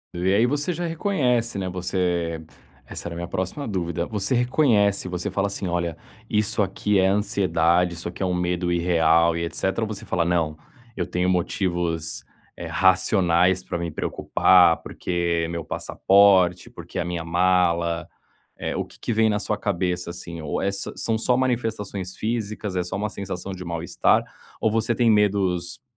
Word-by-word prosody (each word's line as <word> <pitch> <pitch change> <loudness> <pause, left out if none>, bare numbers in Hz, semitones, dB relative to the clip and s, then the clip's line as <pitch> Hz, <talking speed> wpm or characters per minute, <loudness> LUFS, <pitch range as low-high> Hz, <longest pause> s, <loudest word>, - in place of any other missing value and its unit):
E 90 +2 +1
aí 105 +4 +4
você 145 +6 0
já 175 +1 -3
reconhece, 140 - 0
né, 95 -1 -2
você 90 -2 -1 0.5
essa - - -7
era 85 - -6
a - - -6
minha 85 0 -4
próxima 95 +13 -3
dúvida, 85 -4 -2
você 105 +4 -1
reconhece, 120 -6 +2
você 90 +2 -3
fala 100 +1 0
assim: 100 -1 -4
"Olha, 85 -2 -2 0.3
isso 105 0 +1
aqui 100 +1 +1
é 95 - +4
ansiedade, 90 -4 +2
isso 85 - -6
aqui 85 - -8
é - - +2
um 90 - 0
medo 90 0 -1
irreal 85 -1 +3
e 85 - -2
etcétera", 95 +5 -2
ou - - -1
você 105 -2 -7
fala: 85 - 0
"Não, 85 -3 0 0.4
eu 90 -2 -2
tenho 90 0 0
motivos, 85 -3 -1 0.3
eh, - - -7
racionais 95 -1 +3
pra 85 - -4
me 85 0 -3
preocupar, 85 +2 +3
porque 85 -1 -1
é - - -3
meu 85 -1 -5
passaporte, 95 -3 +3
porque - - -7
é - - +1
a - - -3
minha 85 -1 -3
mala"? 85 -1 +1 0.5
Eh, - - -4
o - - -1
que - - -18
que - - -3
vem 110 0 +3
na 105 -1 +1
sua 105 0 -2
cabeça 90 -4 -1
assim, 85 -1 -7
ou 75 -2 -3
é 100 - +1
são 110 +3 -2
só 125 +2 +2
manifestações 110 -7 -2
físicas, 110 -3 -3
é 90 - +1
só 90 +1 -5
uma 105 +2 -2
sensação 95 -1 -6
de 95 -1 -7
mal-estar, 85 -1 +1 0.3
ou 110 - +1
você 115 +2 +1
tem 120 0 +3
medos, 100 0 +1
95 Hz, 180 wpm, -24 LUFS, 85-105 Hz, 0.5 s, aí